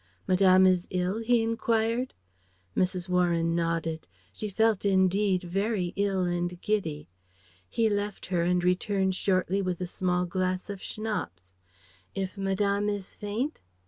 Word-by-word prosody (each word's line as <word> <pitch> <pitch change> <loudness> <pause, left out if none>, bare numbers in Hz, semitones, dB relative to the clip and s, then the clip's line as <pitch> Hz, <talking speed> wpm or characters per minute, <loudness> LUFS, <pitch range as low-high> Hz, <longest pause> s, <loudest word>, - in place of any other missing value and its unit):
"Madame 185 0 +5
is 185 -1 +3
ill?" 185 +3 -1
he 230 0 +2
enquired. 230 +2 0 0.6
Mrs. 185 -1 0
Warren 170 -2 +2
nodded 165 -1 -1 0.3
she 215 - -4
felt 220 0 +2
indeed 190 -1 +2
very 195 0 -1
ill 195 -2 +1
and 175 0 -2
giddy. 165 -9 -2 0.6
He 225 - +2
left 205 -1 -2
her 180 -2 0
and 175 +1 +1
returned 190 +1 +1
shortly 190 +1 +1
with 185 -2 -2
a 180 - -2
small 180 0 0
glass 185 +2 -2
of 195 -2 -7
Schnapps. 95 - -5 0.6
"If 190 -1 -3
Madame 200 +1 0
is 200 -2 -4
faint 220 +9 -3
190 Hz, 135 wpm, -28 LUFS, 180-205 Hz, 0.6 s, Madame